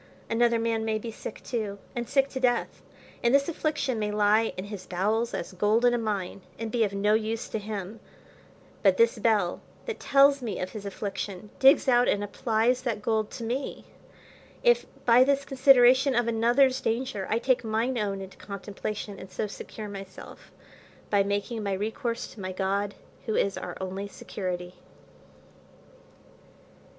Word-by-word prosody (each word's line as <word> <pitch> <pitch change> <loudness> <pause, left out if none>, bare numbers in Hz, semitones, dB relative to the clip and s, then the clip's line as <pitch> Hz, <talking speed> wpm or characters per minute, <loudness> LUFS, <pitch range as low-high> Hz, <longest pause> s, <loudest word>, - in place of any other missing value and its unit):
Another 235 0 +3
man 225 -1 0
may 220 -1 0
be 225 +1 -6
sick 215 - -8
too, 215 -5 -3 0.2
and 240 -1 -3
sick 275 -1 +3
to 260 - -4
death, 245 -2 0 0.4
and 240 +3 +4
this 280 0 +3
affliction 300 -7 -1
may 210 -1 -1
lie 210 +2 +3
in 185 - -3
his 200 -3 -8
bowels, 215 +6 0
as - - -5
gold 210 +5 +2
in 245 - +5
a 240 - +1
mine, 200 -4 -3 0.2
and 225 -1 -4
be 235 -1 +2
of 205 - 0
no 200 +1 +2
use 220 +1 -1
to 220 - -2
him; 210 0 -6 0.8
but 195 -2 +4
this 230 -1 +3
bell, 210 -5 +1 0.2
that 460 -3 -4
tells 275 0 +5
me 230 -4 -4
of 185 - -3
his 205 -2 -7
affliction, 200 0 -5
digs 270 +2 +6
out 245 -1 +4
and 205 - +1
applies 230 +3 +1
that 225 -5 -3
gold 220 -1 0
to 235 - -7
me: 250 +5 -3 0.8
if 485 -1 +4 0.2
by 245 +1 +7
this 280 +1 +1
consideration 260 -1 +5
of 240 0 +2
another's 240 +4 +3
danger 225 -4 -2
I 220 - +2
take 255 +1 +1
mine 225 +3 0
own 200 -2 -2
into 190 0 -10
contemplation, 205 0 -6
and 190 - -10
so 190 - -3
secure 210 +1 -8
myself, 195 -2 -10 0.6
by 205 -1 +4
making 205 +3 -2
my 200 -2 -1
recourse 230 +4 -2
to - - -14
my 185 0 -4
God, 200 +2 -1 0.3
who 220 - 0
is 200 - +1
our - - -6
only 190 +1 -4
security. 180 -3 -5
220 Hz, 170 wpm, -27 LUFS, 200-245 Hz, 0.8 s, by